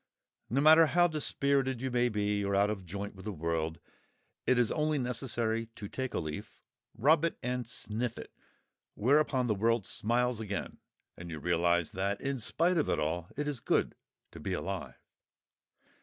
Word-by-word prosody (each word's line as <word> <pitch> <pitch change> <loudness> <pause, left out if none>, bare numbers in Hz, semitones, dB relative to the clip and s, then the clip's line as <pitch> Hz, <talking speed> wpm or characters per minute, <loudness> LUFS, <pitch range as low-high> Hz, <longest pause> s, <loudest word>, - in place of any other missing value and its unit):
No 135 +5 +1
matter 160 +2 +8
how 175 +3 +4
dispirited 140 -4 0
you 130 +1 -3
may 120 0 +2
be 105 -1 0
or 100 0 0
out 100 +1 +3
of 100 -3 -5
joint 100 +3 -5
with 95 - -12
the 105 - -2
world, 80 -2 -2 0.7
it 130 - +4
is 120 -2 +3
only 155 0 +1
necessary 115 -3 0
to 100 - -6
take 130 +3 -4
a - - +1
leaf, 75 -2 -6 0.4
rub 150 +7 +4
it 165 - 0
and 125 -1 -2
sniff 115 0 -3
it, - - -9 0.6
whereupon 130 +1 +3
the 115 - +2
world 115 0 +1
smiles 120 +1 0
again, 105 -2 -4 0.4
and 85 0 -9
you 80 - -5
realise 85 +1 +1
that, 100 +2 -1
in 135 -1 -2
spite 170 +10 +1
of 150 - 0
all, 80 +3 -1
it 150 0 -1
is 145 -4 -2
good - - +1 0.4
to - - -10
be - - -3
alive. - - -4
115 Hz, 170 wpm, -31 LUFS, 100-135 Hz, 0.7 s, matter